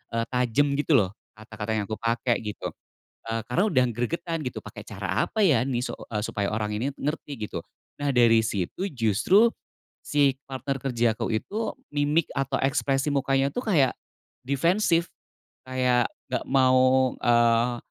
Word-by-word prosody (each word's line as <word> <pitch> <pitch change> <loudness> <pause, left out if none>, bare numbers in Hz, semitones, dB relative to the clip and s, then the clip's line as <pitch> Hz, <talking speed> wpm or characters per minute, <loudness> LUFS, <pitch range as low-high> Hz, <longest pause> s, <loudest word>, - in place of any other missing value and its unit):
eee, 115 0 0
tajam, 125 +3 +2
gitu 150 +1 +3
loh, 95 -7 +3 0.2
kata-kata 110 0 -5
yang 105 - 0
aku 110 +1 -5
pakai, 115 +1 0
gitu. 105 -2 -5 0.5
Eee, 115 0 -3
karena 125 +10 +1
udah 130 -6 +3
gregetan, 165 +7 -2
"Pakai 125 -4 -7
cara 95 -3 -2
apa 215 -3 +1
ya 130 -8 +4
nih, 130 -2 -1
su 125 - -3 0.3
supaya 100 -2 -2
orang 105 -1 -2
ini 120 +7 -1
ngerti?", 150 -2 -4
gitu. - - -6 0.4
Nah, 145 - +1
dari 115 -3 +5
situ 110 - -2
justru 125 - +3 0.6
si 140 -2 +2
partner 135 0 -4
kerjaku 120 -4 0
itu 205 - -2 0.2
mimik 145 +2 +2
atau 135 -1 -1
ekspresi 135 +1 0
mukanya 135 0 +1
tuh 245 - -2
kayak 160 - +2 0.5
defensif, 170 +6 +2 0.6
kayak 125 -2 +1 0.2
nggak 125 - -1
mau, 130 -1 +4
eee, 120 0 +3
130 Hz, 145 wpm, -26 LUFS, 115-145 Hz, 0.6 s, dari